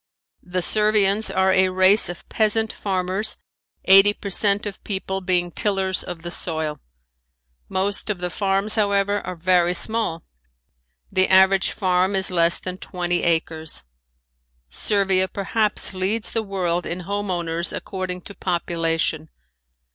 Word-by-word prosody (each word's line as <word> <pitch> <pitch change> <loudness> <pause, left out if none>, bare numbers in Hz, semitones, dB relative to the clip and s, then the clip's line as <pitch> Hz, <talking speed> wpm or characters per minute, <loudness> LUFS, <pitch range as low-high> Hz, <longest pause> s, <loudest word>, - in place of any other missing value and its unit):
The 180 0 -2
Servians 210 0 +2
are 190 0 +1
a 190 0 +3
race 185 +3 +4
of 175 - -8
peasant 220 0 0
farmers, 190 +2 -1 0.5
eighty 195 +2 +6
per 200 -1 -8
cent 200 +2 +3
of 205 -2 -5
the - - -40
people 190 -1 -4
being 180 -2 0
tillers 190 -2 0
of 175 -2 -8
the 175 - -5
soil. 160 -4 -2 0.9
Most 195 +3 -2
of 210 - -1
the 180 0 -4
farms, 195 +2 0
however, 205 -1 +1
are 180 - -6
very 175 0 +2
small. 220 -6 0 0.9
The 185 0 +3
average 190 0 +4
farm 185 0 0
is 190 0 +2
less 170 -1 +3
than 185 0 -7
twenty 175 -2 -2
acres. 160 -1 -1 0.9
Servia 195 - +1
perhaps 210 +2 0
leads 195 +4 -1
the 225 - -1
world 180 -4 -2
in 175 +2 -4
home 200 +2 -4
owners 170 -1 0
according 185 -2 -5
to 200 - -10
population. 165 -3 -2
190 Hz, 140 wpm, -22 LUFS, 175-200 Hz, 0.9 s, eighty